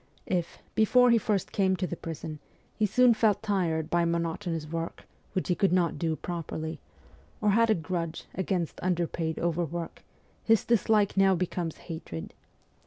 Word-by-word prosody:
If, 175 -2 -2
before 250 +3 +5
he 235 - +5
first 205 -2 -1
came 190 -2 +2
to 185 - -2
the 175 - -4
prison, 160 -2 -6 0.3
he 215 - +1
soon 250 +4 +5
felt 215 -2 +2
tired 170 -6 0
by 175 0 +3
monotonous 170 -1 -1
work, 165 +1 -5 0.3
which 185 - -1
he 180 - +3
could 195 +1 +2
not 180 -2 +1
do 160 -2 0
properly, 160 -1 -5 0.6
or 210 -1 +3
had 230 +2 +4
a 220 - +5
grudge 165 -1 -3
against 185 -3 -2
underpaid 170 -2 -1
overwork, 170 0 -2 0.4
his 225 -2 +3
dislike 215 -3 +2
now 195 -1 +5
becomes 175 -2 -2
hatred. 160 - -7
175 Hz, 155 wpm, -28 LUFS, 165-200 Hz, 0.6 s, before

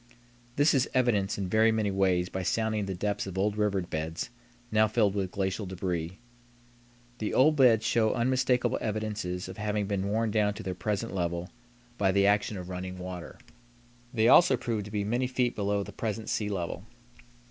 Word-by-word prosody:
This 145 +3 +4
is 135 -1 +2
evidenced 110 -6 +2
in 100 -2 -2
very 110 +3 +4
many 110 -2 0
ways 95 -2 +2
by 95 - -4
sounding 110 +1 0
the 95 - -3
depths 100 +2 -2
of 95 -1 -6
old 100 +2 +1
river 105 -2 +1
beds 80 +5 -4 0.4
now 110 0 +4
filled 105 -2 +2
with 95 -2 -1
glacial 95 +2 -2
débris. 90 -2 -3 1.1
The 105 - -2
old 150 +4 +5
beds 120 -6 +5
show 110 -2 +2
unmistakable 125 0 +1
evidences 105 -4 -3
of - - -9
having 105 -1 -1
been 100 -1 -2
worn 110 +1 0
down 105 -1 +1
to - - -7
their 95 0 -3
present 105 +4 -3
level 85 -1 -2 0.5
by 95 -2 +3
the 100 +1 +3
action 105 +1 +2
of 90 -1 -7
running 90 0 -5
water. 90 -1 -7 0.7
They 115 -3 +2
also 135 -2 +6
prove 110 -4 -3
to 105 - -9
be 105 -1 -1
many 120 +5 0
feet 125 -1 0
below 100 0 0
the - - -9
present 110 -1 -4
sea 105 -2 -1
level. 90 -2 -4
105 Hz, 180 wpm, -29 LUFS, 95-110 Hz, 1.1 s, also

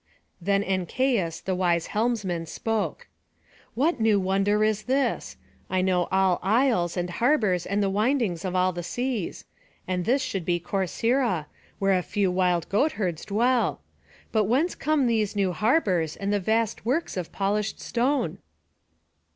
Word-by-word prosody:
Then 200 +2 +1
Ancaius, 190 -1 0
the 190 - -2
wise 175 -2 +1
helmsman, 210 -7 -1
spoke: 210 -1 -3 0.7
"What 285 +4 +1
new 220 -2 +3
wonder 195 +3 +1
is 215 0 0
this? 270 +2 -1 0.3
I 185 0 +1
know 180 -2 +1
all 190 -2 +3
isles, 210 -5 +2
and 175 0 -1
harbours, 205 - +1
and 200 +2 0
the 195 - +1
windings 210 -4 0
of 185 -1 -3
all 185 0 +2
the 175 - -4
seas; 235 +3 -3 0.4
and 180 -1 -1
this 260 +8 +2
should 195 -3 -3
be 175 +1 0
Corcyra, 195 - 0 0.3
where 195 -1 +2
a 180 - +1
few 195 +1 0
wild 180 -2 +1
goatherds 200 - 0
dwell. 235 +4 +1 0.5
But 215 -2 +2
whence 275 - +1
come 305 -3 +1
these 220 -4 +1
new 195 -2 +1
harbours, 190 - +1
and 200 +1 -2
vast 220 +3 0
works 275 +9 -1
of 180 -3 -4
polished 205 +2 -1
stone?" 260 +4 -1
200 Hz, 145 wpm, -26 LUFS, 180-235 Hz, 0.7 s, new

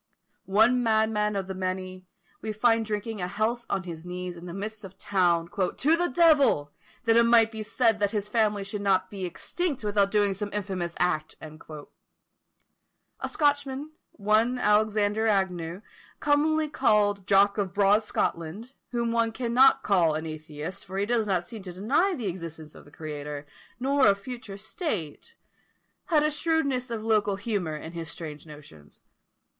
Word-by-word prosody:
One 225 +6 +4
madman 220 -2 +1
of 195 -1 -2
the 190 - -5
many, 185 0 -4 0.3
we 220 - -3
find 225 +1 +3
drinking 215 -1 -4
a 180 - -1
health 220 +5 -2
on 195 - -1
his 165 -3 -8
knees, 180 0 -6
in 175 +1 -10
the - - -6
midst 210 +2 -6
of 195 -1 -9
a - - -36
town, 175 -4 +1
"to 210 - +1
the 350 +1 +1
devil! 285 - +4 0.3
that 230 -1 +3
it - - +7
might 230 -1 +5
be 220 -1 -6
said 225 0 +1
that 205 -1 +2
his 210 -1 -2
family 210 -2 +1
should 200 +1 -4
not 190 -2 +1
be 195 -2 -4
extinct 285 - -3
without 205 -1 +2
doing 205 -1 +2
some 205 +2 -4
infamous 185 -4 -3
act." 155 -3 0
A 155 -1 -13
Scotchman, 285 0 0 0.2
one 220 +4 +2
Alexander 210 -1 +2
Agnew, 185 -3 -1 0.4
commonly 305 +2 +2
called 205 -8 +2
"Jock 200 +1 +4
of 195 -3 -1
broad 205 +3 +4
Scotland," 205 +5 -3 0.2
whom 235 -1 -1
one 230 -1 +1
cannot 245 +3 +4
call 170 -6 +3
an 160 +1 -3
atheist, 155 +4 -6
for 190 - -7
he 200 - +1
does 225 -1 +1
not 185 -3 +1
seem 220 +4 -9
to 185 -2 -8
deny 280 - +1
the 245 -7 -5
existence 165 -4 -6
of - - -14
the 145 - -17
Creator, 150 -2 -6 0.3
nor 270 0 +3
a 200 - +5
future 210 -1 -8
state, 220 - -4 0.7
had 305 -3 +3
a 305 - +2
shrewdness 285 -5 0
of 225 -2 -4
local 210 -3 +2
humour 195 -7 -2
in 160 - -8
his 165 -2 -6
strange 150 0 -7
notions. 110 - -14
205 Hz, 165 wpm, -27 LUFS, 180-230 Hz, 0.7 s, it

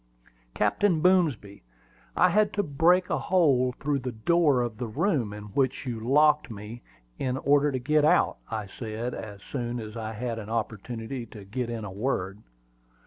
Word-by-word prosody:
"Captain 165 - +2
Boomsby, 155 - +2 0.5
I - - +5
had 210 0 +3
to 205 - 0
break 175 +4 +3
a - - +1
hole 140 -9 +3
through 145 -1 0
the 125 -1 -4
door 140 +3 +2
of 120 -2 -5
the 120 - -3
room 120 - 0
in 105 0 -8
which 130 +1 0
you 120 -3 -3
locked 150 +3 +3
me, 110 +2 -8 0.4
in 130 -1 -1
order 145 +2 +3
to 130 - -1
get 150 +4 +2
out," 150 - +3
I 110 -2 -3
said, 110 +4 -5
as 100 -2 -8
soon 120 -2 -4
as 110 -1 -8
I 110 -1 -4
had 115 +1 -4
an 105 -1 -8
opportunity 115 +2 -4
to 105 -2 -11
get 120 +4 -3
in 115 -2 -4
a 100 - -6
word. 100 -2 -2
125 Hz, 175 wpm, -27 LUFS, 110-145 Hz, 0.5 s, I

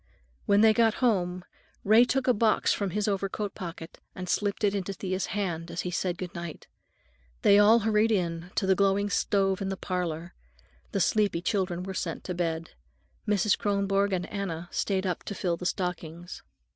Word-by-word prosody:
When 200 0 +5
they 220 0 +6
got 225 -1 +3
home, 185 -7 0 0.4
Ray 220 +4 +6
took 265 +1 -1
a 250 - +5
box 220 0 +2
from 200 -2 -2
his 210 +3 -1
overcoat 200 0 -2
pocket 170 -2 -8 0.2
and 185 0 -6
slipped 205 +3 -1
it 200 -1 +3
into 195 -1 -2
Thea's 185 -1 -3
hand 175 -4 -3
as 175 - -3
he 180 - -4
said 175 0 -1
goodnight. 170 -3 -7 0.8
They 200 0 +7
all 220 +3 +6
hurried 220 +1 +2
in 170 -3 -1
to - - +1
the 190 - +4
glowing 200 +1 +1
stove 195 -1 +1
in 195 - -2
the 195 - -3
parlor. 175 -3 -3 0.6
The 195 - 0
sleepy 200 -2 +1
children 180 -3 -1
were 190 +1 -5
sent 165 -3 -4
to 180 - -4
bed. 165 -2 -2 0.6
Mrs. 210 0 +3
Kronborg 200 0 +1
and 180 -1 -1
Anna 175 -4 -4
stayed 195 -1 -1
up 180 -3 -2
to 205 - -5
fill 175 -2 -1
the 180 +1 -3
stockings. 175 -2 -4
195 Hz, 180 wpm, -28 LUFS, 175-205 Hz, 0.8 s, They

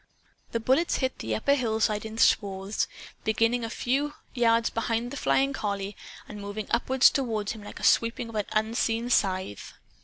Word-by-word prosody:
The 230 - -1
bullets 265 +9 +2
hit 260 -1 -1
the 110 -1 -2
upper 280 - +2
hillside 220 -5 0
in 220 0 -9
swathes, 195 -2 +2 0.4
beginning 230 +2 +1
a 225 - -3
few 275 +6 -1 0.2
yards 230 -2 +3
behind 230 +1 -1
the - - -5
flying 275 0 +2
collie 200 -4 -3 0.3
and 210 -1 -8
moving 205 +1 -5
upward 255 +2 0
toward 225 -8 +3
him 220 - -8
like 205 - -9
a - - -10
sweeping 230 +1 +3
of - - -10
an 210 -2 0
unseen 225 +2 0
scythe. 185 - 0
225 Hz, 165 wpm, -27 LUFS, 210-245 Hz, 0.4 s, yards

